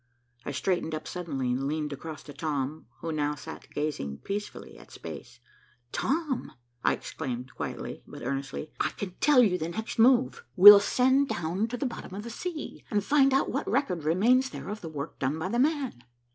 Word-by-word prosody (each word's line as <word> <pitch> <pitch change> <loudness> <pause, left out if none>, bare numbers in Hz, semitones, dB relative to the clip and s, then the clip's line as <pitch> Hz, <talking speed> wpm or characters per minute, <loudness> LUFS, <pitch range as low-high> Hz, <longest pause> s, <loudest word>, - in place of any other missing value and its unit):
I - - -3
straightened 160 +2 -1
up 155 - -6
suddenly 140 -8 -3
and 135 +2 -1
leaned 150 0 -2
across 150 +1 -8
to 145 - -10
Tom, 145 -2 -3
who 165 - -3
now 150 -1 0
sat 145 - -10
gazing 145 - -3
peacefully 205 +1 -5
at - - -16
space. - - -9 0.5
"Tom," 295 -2 -1 0.3
I - - +4
exclaimed 130 -4 -5
quietly, - - -5
but - - -10
earnestly, 140 +2 -4
"I - - +2
can 200 -2 -6
tell 280 -4 +6
you 180 -5 +2
the 160 - -2
next 220 +6 -5
move. 255 - +4
We'll 205 +1 +12
send 260 +6 +3
down 175 +6 -1
to 245 +2 -4
the 275 - -2
bottom 230 -6 -6
of 205 - -5
the 235 - -7
sea, 330 +4 -6
and 205 -2 +1
find 275 +2 +4
out 270 - +2
what - - -2
record 195 - 0
remains 235 - +3
there - - -7
of 210 +1 -5
the 165 - -6
work 145 -1 -6
done 135 +4 0
by 160 +3 -3
'the 235 +3 0
man. 275 - 0
180 Hz, 190 wpm, -28 LUFS, 150-245 Hz, 0.5 s, We'll